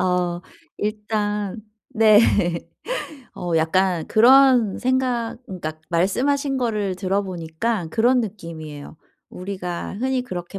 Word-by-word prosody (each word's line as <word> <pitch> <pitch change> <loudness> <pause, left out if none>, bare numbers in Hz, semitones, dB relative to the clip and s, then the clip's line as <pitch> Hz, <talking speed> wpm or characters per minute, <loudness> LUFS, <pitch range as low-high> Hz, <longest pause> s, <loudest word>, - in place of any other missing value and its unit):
어 180 -1 0 0.4
일단 210 -1 -2 0.3
네. 220 -4 +6 1.2
어 175 -1 -4
약간 175 +1 +1
그런 250 -2 +5
생각 255 -2 0
그러니까 155 -4 -6
말씀하신 270 +11 +1
거를 210 -6 -1
들어보니까 185 0 -2
그런 240 +6 +3
느낌이에요. 160 -9 -7 0.3
우리가 180 -1 -5
흔히 260 0 0
그렇게 185 -5 -6
200 Hz, 235 characters per minute, -22 LUFS, 180-235 Hz, 1.2 s, 네